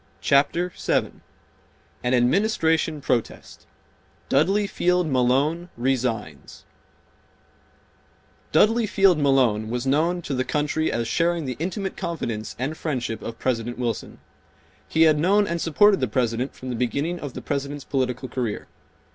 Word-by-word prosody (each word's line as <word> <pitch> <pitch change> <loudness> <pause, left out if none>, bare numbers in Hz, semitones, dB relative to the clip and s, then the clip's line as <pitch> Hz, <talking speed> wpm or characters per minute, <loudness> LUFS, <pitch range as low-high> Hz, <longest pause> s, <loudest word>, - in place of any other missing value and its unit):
Chapter 155 +6 +2
7 - - -1 0.8
An 125 - +1
Administration 160 - +1
Protest—Dudley 150 - -2
Field 180 -2 +1
Malone 140 +6 +1
Resigns 125 -3 -3 1.9
Dudley 225 +1 +4
Field 195 -5 +4
Malone 125 -7 +2
was 120 +2 -3
known 165 +6 +1
to 145 - -4
the 130 -1 0
country 150 +3 -1
as 115 -1 -1
sharing 170 +3 0
the 130 -1 -3
intimate 190 +3 -3
confidence 120 - -4
and 135 +6 -3
friendship 130 -8 -3
of 115 0 -6
President 120 -1 -2
Wilson. 120 -2 -3 0.7
He 160 - +3
had 155 -2 +4
known 200 +6 +3
and 170 -3 -3
supported 200 +5 +4
the 130 - 0
President 120 +3 -1
from 130 0 -7
the - - -3
beginning 140 +9 -1
of 145 -3 -6
the - - -7
President's 140 0 -3
political 130 -1 -2
career. 120 -3 -3
140 Hz, 130 wpm, -24 LUFS, 125-170 Hz, 1.9 s, Dudley